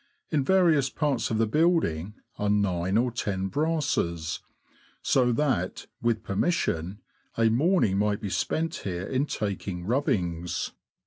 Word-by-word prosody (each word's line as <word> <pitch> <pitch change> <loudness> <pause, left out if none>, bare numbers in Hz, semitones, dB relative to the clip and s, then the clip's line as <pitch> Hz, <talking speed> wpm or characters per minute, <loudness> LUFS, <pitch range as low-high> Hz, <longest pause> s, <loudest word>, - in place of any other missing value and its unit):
In 150 -4 +2
various 160 -5 +4
parts 135 -5 0
of 110 - 0
the 115 - +3
building 110 - +1 0.2
are 105 - 0
nine 95 -2 +1
or 120 +1 +2
ten 95 -5 -2
brasses; 145 - -1 0.6
so 125 -2 +3
that 120 -9 0 0.2
(with 115 -2 0
permission) 100 - 0 0.4
a 115 -1 +4
morning 120 - +2
might 105 0 +1
be 100 -3 -4
spent 160 - -1
here 90 -1 -4
in 135 +5 0
taking 100 -6 -3
rubbings." 90 - -1
110 Hz, 130 wpm, -27 LUFS, 95-145 Hz, 0.6 s, various